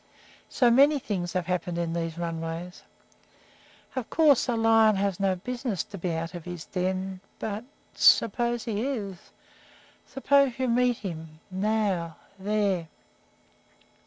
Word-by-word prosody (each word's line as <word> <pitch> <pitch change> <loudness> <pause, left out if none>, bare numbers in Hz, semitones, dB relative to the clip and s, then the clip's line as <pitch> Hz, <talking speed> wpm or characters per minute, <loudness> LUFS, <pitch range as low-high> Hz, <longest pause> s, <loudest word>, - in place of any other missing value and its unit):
So 245 -2 +3
many 280 +5 +6
things 190 -9 -3
have 180 -2 -1
happened 180 -1 -2
in 170 -1 -1
these 165 -1 -3
runways! 165 +1 -5 1.1
Of 255 -3 -3
course 300 -6 +4
a 240 - +1
lion 225 -1 +5
has 195 -1 -1
no 195 -1 +2
business 240 +1 -3
to 200 - -10
be 175 0 -2
out 165 +1 -3
of 175 -2 -8
his 175 -2 -7
den, 185 0 -3 0.2
but 215 +2 -4 0.3
but - - -14
suppose 235 +1 +4
he 220 -3 -2
is? 210 -8 -4 0.8
Suppose 275 -1 +2
you 260 -1 0
meet 245 0 +2
him 160 -5 -7
now 190 -4 0 0.2
there! 200 -4 0
195 Hz, 135 wpm, -27 LUFS, 175-235 Hz, 1.1 s, many